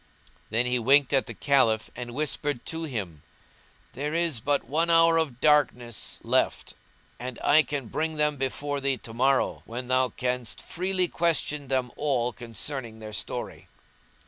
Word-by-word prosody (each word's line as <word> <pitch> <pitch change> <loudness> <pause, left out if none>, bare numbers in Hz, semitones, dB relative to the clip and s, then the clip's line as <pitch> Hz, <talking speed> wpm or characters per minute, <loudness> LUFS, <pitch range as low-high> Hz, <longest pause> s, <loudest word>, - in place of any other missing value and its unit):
Then 115 +3 +1
he 125 0 +1
winked 135 +4 +4
at 135 -5 +2
the 120 - -7
Caliph 115 -3 +2
and 120 -1 -6
whispered 145 -3 -2
to 165 0 -4
him, 100 - -5 0.7
"There 150 +3 -3
is 165 -7 +1
but 145 +5 0
one 160 +5 0
hour 165 0 +6
of 145 -7 -1
darkness 125 -7 +2
left - - 0 0.5
and 125 0 -6
I 150 +2 +6
can 145 -4 -4
bring 160 +8 -2
them 150 -1 +2
before 140 +1 -2
thee 135 -1 0
to 115 - -10
morrow, 135 +3 +2
when 125 +2 -6
thou 130 0 +3
canst 125 -2 -3
freely 185 0 -1
question 155 -4 0
them 130 -2 0
all 125 -5 0
concerning 120 0 -5
their 110 -1 -9
story." 105 - -4
135 Hz, 155 wpm, -27 LUFS, 120-150 Hz, 0.7 s, hour